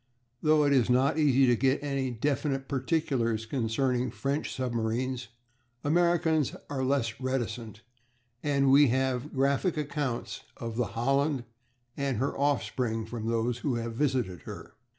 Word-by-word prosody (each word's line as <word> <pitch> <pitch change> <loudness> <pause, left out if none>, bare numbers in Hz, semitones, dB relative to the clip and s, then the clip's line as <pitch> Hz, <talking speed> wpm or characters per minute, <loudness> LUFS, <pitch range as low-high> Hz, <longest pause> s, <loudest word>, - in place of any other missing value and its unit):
Though 155 0 +4
it 140 - +3
is 125 -3 +3
not 135 +5 +3
easy 135 -3 +5
to 125 -1 +4
get 135 +4 +1
any 140 -2 -1
definite 135 +2 -1
particulars 130 -5 0
concerning 125 +1 0
French 135 +7 -2
submarines 125 0 -2 0.6
Americans 160 -1 +2 0.2
are 135 -2 -1
less 130 -4 0
reticent, 120 -4 -3 0.6
and 140 -2 +2
we 145 +1 +7
have 130 +2 0
graphic 140 +5 +1
accounts 145 -4 -3 0.2
of 115 -1 -5
the 120 -4 -1
Holland 135 +2 +1 0.5
and 140 -4 -1
her 135 +5 -1
offspring 125 -5 0
from 115 -1 -5
those 115 +1 0
who 130 0 -1
have 115 0 -3
visited 120 - -1
her. - - -9
130 Hz, 135 wpm, -29 LUFS, 120-140 Hz, 0.6 s, we